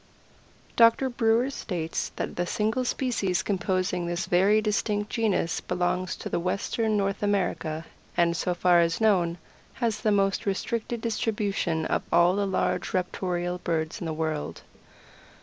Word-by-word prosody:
Doctor 230 +3 +5
Brewer 240 +2 +2
states 170 -10 -3
that - - -4
the 175 0 -1
single 220 +6 0
species 200 -9 0
composing 185 -2 -1
this 175 +1 -2
very 195 +4 +4
distinct 210 -1 -1
genus 215 -7 0
belongs 180 0 -1
to - - -3
western 210 +4 0
North 195 -1 -1
America, 180 -6 -1 0.3
and, 170 -1 +3
so 180 +1 -1
far 175 0 +4
as 165 -1 +1
known, 180 -6 +2 0.4
has 225 -4 -1
the 215 - +1
most 195 0 +1
restricted 225 +4 -2
distribution 205 -7 -1
of - - 0
all 175 +2 +5
the 200 0 0
large 190 - -1
raptorial 180 -1 -2
birds 160 -1 -1
in 170 - -4
the - - -2
world. 155 -1 -3
190 Hz, 140 wpm, -27 LUFS, 175-215 Hz, 0.4 s, Doctor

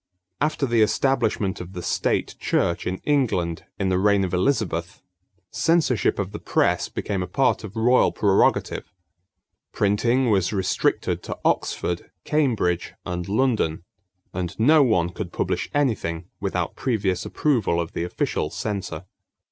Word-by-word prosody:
After 150 -1 +1
the 120 -3 +2
establishment 110 -5 +1
of 90 +1 -9
the 90 -2 -6
State - - 0
Church 85 - 0
in 90 +1 -1
England 110 - 0
in 95 -2 0
the 90 0 +2
reign 100 0 +3
of 90 -2 -3
Elizabeth, 90 -5 -1 0.5
censorship 165 -8 +2
of 100 -1 -3
the 105 - -6
press - - +1
became 100 -3 -3
a 90 - -3
part 135 -4 +1
of 105 0 -8
royal 120 +3 +4
prerogative. 100 -2 +1 0.8
Printing 115 +5 +2
was 95 -3 +2
restricted 95 -3 0
to - - -6
Oxford, 85 -1 -1
Cambridge, 115 - 0
and 90 0 -4
London; 105 -8 +1 0.5
and 90 +1 -4
no 150 +7 +6
one 90 -10 +3
could 90 -1 -6
publish - - -2
anything 105 - -1
without 90 -4 -2
previous 100 -8 -1
approval 115 - +1
of 85 -1 -3
the - - -2
official 90 - -2
censor. 95 -5 -4
100 Hz, 140 wpm, -24 LUFS, 90-125 Hz, 0.8 s, no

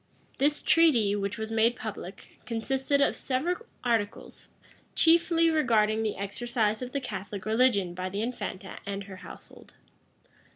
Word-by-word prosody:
This 295 +2 +2
treaty, 245 -12 +4
which 200 +2 -3
was 220 0 -5
made 225 +2 +3
public, 200 -4 -8
consisted 265 +4 0
of - - +3
several 345 - -2 0.2
articles, 225 -4 -2 0.5
chiefly 330 0 +4
regarding 225 -8 +2
the 220 -2 -2
exercise 215 +2 -1
of 250 0 -5
the 280 - -1
Catholic 200 -6 -6
religion 215 -5 +2
by 185 +1 -4
the 200 +3 -3
infanta 215 -5 -5
and 200 0 -4
her 195 -1 -10
household. 185 - -13
225 Hz, 135 wpm, -28 LUFS, 200-265 Hz, 0.5 s, treaty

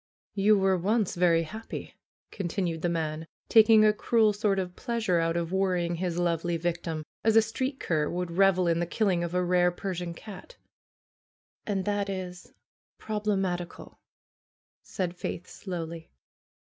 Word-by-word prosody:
^'You 205 +1 +4
were 190 -1 +2
once 210 +2 +1
very 170 -2 +3
happy," 220 +8 -7 0.4
continued 175 -3 -2
the 175 - +1
man, 160 -1 -2 0.2
taking 220 -1 +7
a 210 - +5
cruel 215 0 +3
sort 205 -1 +1
of 180 -1 -3
pleasure 225 -8 0
out 165 0 0
of 170 0 -2
worrying 180 -3 0
his 175 -1 -2
lovely 170 -1 0
victim, 165 -2 -3 0.2
as 220 0 +3
a 225 - +8
street 260 +5 -3
cur 155 -3 0
would 180 0 -3
revel 185 0 +3
in 170 0 +2
the 175 - -1
killing 185 -3 +1
of 170 +1 -3
a 180 - +2
rare 180 0 +3
Persian 175 -2 -4
cat. 215 - -11 1.1
"And 195 -3 -1
that 205 -1 -1
is 180 -2 -6 0.5
problematical," 195 -5 -3 0.8
said 180 -2 -4
Faith 180 0 -5
slowly. 170 -3 -7
180 Hz, 145 wpm, -28 LUFS, 170-205 Hz, 1.1 s, a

